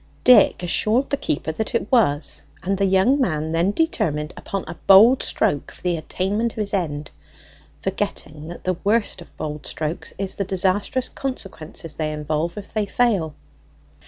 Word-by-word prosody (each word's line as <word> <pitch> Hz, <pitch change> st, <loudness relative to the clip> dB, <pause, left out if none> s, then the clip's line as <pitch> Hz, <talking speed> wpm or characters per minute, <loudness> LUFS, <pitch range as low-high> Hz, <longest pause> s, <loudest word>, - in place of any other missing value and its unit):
Dick 250 Hz, -6 st, +6 dB
assured 215 Hz, +9 st, +1 dB
the 280 Hz, -, +2 dB
keeper 155 Hz, -, -2 dB
that 220 Hz, +9 st, -3 dB
it 225 Hz, -, -1 dB
was; 155 Hz, -, +2 dB, 0.2 s
and 195 Hz, +2 st, 0 dB
the 200 Hz, -, +3 dB
young 195 Hz, +10 st, +3 dB
man 155 Hz, -8 st, 0 dB
then 165 Hz, +3 st, +2 dB
determined 175 Hz, -, 0 dB
upon 195 Hz, -1 st, -4 dB
a -, -, -5 dB
bold 220 Hz, +7 st, +8 dB
stroke 145 Hz, -, -1 dB
for -, -, -15 dB
the 180 Hz, -1 st, +1 dB
attainment 200 Hz, +8 st, -1 dB
of -, -, -22 dB
his 210 Hz, -2 st, -2 dB
end, 150 Hz, -6 st, -2 dB, 0.7 s
forgetting 150 Hz, 0 st, -3 dB
that 175 Hz, -, -9 dB
the 185 Hz, -1 st, 0 dB
worst 210 Hz, -2 st, +1 dB
of 170 Hz, -, -15 dB
bold 150 Hz, -1 st, -5 dB
strokes 155 Hz, +2 st, -4 dB
is 195 Hz, -1 st, -2 dB
the 200 Hz, -, -2 dB
disastrous 195 Hz, +7 st, 0 dB
consequences 185 Hz, -, -6 dB
they 155 Hz, -1 st, -1 dB
involve 155 Hz, +3 st, -2 dB
if 205 Hz, -, -9 dB
they 215 Hz, -2 st, 0 dB
fail. 200 Hz, -11 st, +1 dB
185 Hz, 165 wpm, -22 LUFS, 155-215 Hz, 0.7 s, bold